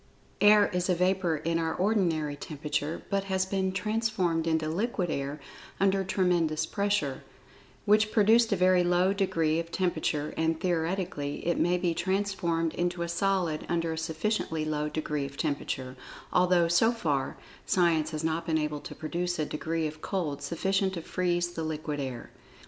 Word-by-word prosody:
Air 205 0 +7
is 180 +1 -1
a 180 - +4
vapor 180 -1 +1
in 165 +2 -1
our 160 -1 -1
ordinary 175 -7 +1
temperature, 150 +1 -3
but 195 0 0
has 190 -1 0
been 190 0 -1
transformed 190 -5 0
into 160 -1 +1
"liquid 180 +1 -1
air" 140 +1 -3 0.4
under 195 0 +3
tremendous 180 -5 +1
pressure, 200 -9 -1 0.6
which 215 +1 +4
produced 225 +2 +4
a - - +4
very 185 -1 +4
low 180 +2 +3
degree 165 -5 +1
of 165 0 -5
temperature, 155 -5 -1
and, 160 0 0
theoretically, 170 -4 -2
it 170 - +1
may 175 +1 +3
be 175 -2 0
transformed 180 -3 0
into 175 0 -1
a[Pg 170 - -2
64] 170 - -4
solid 185 -6 0
under 165 -1 0
a - - -3
sufficiently 160 0 -1
low 150 -1 -1
degree 150 -2 -2
of 140 0 -13
temperature, 135 -4 -3 0.4
although 180 -1 +4
so 175 +7 +4
far, 150 - -1 0.3
Science 165 -4 +2
has 155 -1 -4
not 160 +1 0
been 160 -1 0
able 150 -1 -2
to - - -9
produce 175 +3 -2
a 155 - 0
degree 160 +2 -2
of 155 0 -5
cold 155 -8 -2
sufficient 190 +5 0
to 170 - -5
"freeze" 175 -1 0
the 170 - -5
liquid 155 -1 -3
air. 130 -4 -5
170 Hz, 165 wpm, -28 LUFS, 155-190 Hz, 0.6 s, Air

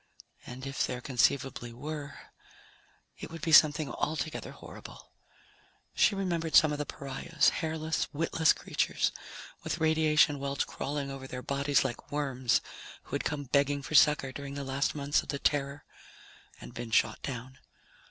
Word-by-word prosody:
And 130 +2 -8
if 135 0 -1
there 125 - -4
conceivably 130 -1 0
were, 145 +3 -6 1.0
it - - -7
would 165 -2 -9
be 165 - 0
something 155 -1 +6
altogether 155 0 -3
horrible. - - -12 0.8
She 205 - +3
remembered 170 -4 -1
some 155 -2 +7
of 150 - -3
the 150 - -3
pariahs 140 +3 0
hairless, 160 -1 -1
witless 160 0 +2
creatures, - - 0 0.5
with - - -2
radiation 155 -2 +3
welts 140 0 -1
crawling 140 -1 -4
over 135 -1 -7
their 125 -1 -6
bodies 140 +1 +1
like 125 -2 -5
worms, 130 -4 +1 0.4
who - - -19
had - - -1
come 145 -1 -2
begging 140 +1 +1
for 155 - -7
succor 150 -3 +5
during 140 +1 -7
the 140 - -4
last 135 +2 -1
months 145 0 +1
of - - -15
the 140 - -1
Terror 140 0 -1 0.7
and - - -11
been 120 -1 -6
shot 110 - +2
down. 130 0 -6
140 Hz, 150 wpm, -30 LUFS, 135-155 Hz, 1.0 s, some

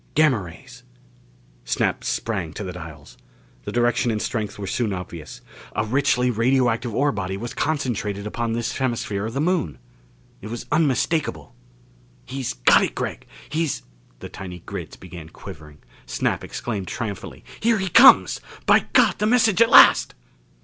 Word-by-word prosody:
Gamma 150 -8 +4
rays! 125 +9 -12 0.8
Snap - - -1
sprang 95 -8 -3
to 105 - -6
the 90 -2 -6
dials. 80 -4 -11 0.5
The - - -4
direction 120 0 +1
and 110 -2 -1
strength 105 -1 -3
were 100 - -5
soon 110 +1 -1
obvious. 85 -4 -8 0.3
A 105 - 0
richly 125 0 +1
radioactive 120 -1 +1
ore 145 +1 +2
body 95 -2 -4
was 115 +3 -6
concentrated 115 -9 -2
upon 115 +2 -3
this 115 0 -2
hemisphere 110 -5 -2
of 115 - -7
the - - -1
Moon! 160 - 0 0.6
It 105 - -8
was 115 +1 -6
unmistakable. 155 +1 0 0.7
"He's 130 -1 -4
got - - +4
it, - - -3
Gregg! - - -5 0.2
He's 155 -1 -2 0.2
" - - -33
The - - -7
tiny 90 -2 -9
grids - - -7
began 85 -3 -11
quivering. 75 -2 -12 0.3
Snap 60 0 -1
exclaimed 100 -6 -5
triumphantly, 105 -2 -6
"Here 230 0 +2
he 190 -1 -2
comes! 240 +9 +7 0.2
By - - +4
God, - - +4
the 210 - +1
message 230 -3 +3
at 230 - +6
last!" - - +7
115 Hz, 155 wpm, -23 LUFS, 95-135 Hz, 0.8 s, comes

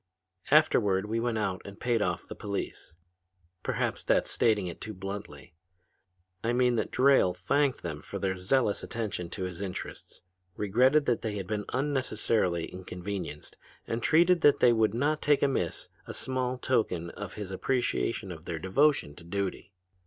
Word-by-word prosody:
"Afterward, 95 -1 +4
we 110 +2 -1
went 115 -1 0
out 95 -3 -1
and 100 +1 -10
paid 120 -2 +1
off 90 -4 -1
the - - -6
police. 100 -5 -5 0.7
Perhaps - - -1
that's - - +2
stating 105 -4 +2
it 85 -2 -7
too 110 -1 -6
bluntly. 95 -8 -7 0.9
I 115 +1 +1
mean 125 0 +3
that 115 - 0
Drayle 130 -9 +4
thanked 135 +8 +1
them 75 -3 -4
for 100 - -6
their 95 0 0
zealous 100 +4 +1
attention 105 -7 -4
to 95 +2 -5
his 90 0 -5
interests, 95 -2 -6 0.3
regretted 130 +9 +3
that 120 - +1
they 110 -2 -3
had 100 -2 -4
been 105 +1 -3
unnecessarily 115 - 0
inconvenienced 90 -4 -6 0.3
and 115 +1 -3
treated 170 +5 +4
that 145 - +5
they 120 - +6
would 110 -1 +2
not 150 +5 +1
take 145 -1 +3
amiss 130 - -1 0.2
a - - -6
small 130 -1 -1
token 90 -10 0
of - - -7
his 105 -3 -6
appreciation 115 -2 -1
of 80 -1 -9
their 80 - -3
devotion 95 - +2
to 85 - -11
duty. 100 +2 -3
105 Hz, 160 wpm, -29 LUFS, 90-125 Hz, 0.9 s, they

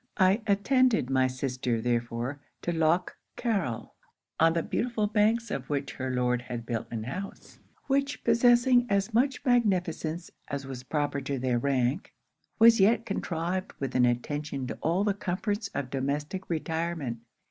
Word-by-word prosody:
'I 190 +3 +4
attended 210 - +3
my 130 -1 +3
sister 125 -2 -2
therefore 120 +3 -2 0.2
to 175 - 0
Lough 165 +2 +2 0.3
Carryl; 195 - -1 0.5
on 165 0 +5
the 165 -1 0
beautiful 235 -3 -1
banks 220 +2 +2
of 130 -1 -4
which 140 -2 -2
her 130 0 -4
Lord 125 -1 +1
had 120 -1 -6
built 115 -1 -3
an 115 -2 -4
house, 185 - -7 0.3
which 280 +1 0
possessing 245 +1 +4
as 200 +3 +1
much 260 +3 +1
magnificence 180 - +1 0.2
as 140 -1 -4
was 130 -2 -6
proper 145 +1 -1
to 135 +1 -3
their 125 -1 0
rank, 135 +4 0 0.4
was 230 0 +7
yet 225 +4 +4
contrived 185 -2 -2
with 135 -2 -3
an 125 -1 +4
attention 140 +3 -2
to - - -6
all 170 +5 +1
the 205 -1 +2
comforts 205 +2 -2
of 130 -2 -3
domestic 145 +7 -3
retirement. 160 -6 -2
160 Hz, 150 wpm, -28 LUFS, 130-205 Hz, 0.5 s, was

